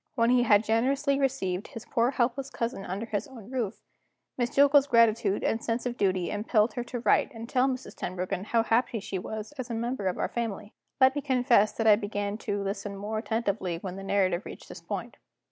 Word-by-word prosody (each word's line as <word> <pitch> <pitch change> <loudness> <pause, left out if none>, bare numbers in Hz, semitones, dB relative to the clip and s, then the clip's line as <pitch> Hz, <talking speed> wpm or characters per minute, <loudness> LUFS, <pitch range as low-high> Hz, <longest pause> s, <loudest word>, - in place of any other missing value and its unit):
When 230 -1 +3
he 250 -1 +5
had 215 -3 +5
generously 270 +5 +1
received 205 -9 -1
his 230 0 -9
poor 235 +1 +1
helpless 260 +1 -1
cousin 230 -5 -3
under 195 +5 -4
his 220 +4 -3
own 240 -4 -12
roof, 230 -5 -3 0.5
Miss 245 -1 0
Jillgall's 285 +1 +5
gratitude 225 -5 +3
and 225 - 0
sense 230 +2 -2
of 245 -1 -2
duty 185 -5 0
impelled 215 +1 +1
her 245 - -3
to 245 -1 -5
write 250 - +3
and 225 +1 -7
tell 255 +2 +2
Mrs. 260 -1 -4
Tenbruggen 185 +1 -4
how 230 +1 +2
happy 230 0 +1
she 195 -1 -4
was 220 +5 -6
as 255 -1 -4
a 230 - -2
member 235 -3 -2
of 185 - -1
our - - 0
family. 220 -3 -4 0.3
Let 260 0 +6
me 290 - -2
confess 250 -6 +3
that 225 - -2
I 210 -2 +7
began 205 0 -3
to 205 -2 -2
listen 200 0 -4
more 215 +2 -3
attentively 205 -6 -1
when 180 +1 -6
the 195 - -7
narrative 190 -2 +1
reached - - -10
this - - -9
point. - - -5
225 Hz, 210 wpm, -28 LUFS, 200-245 Hz, 0.5 s, I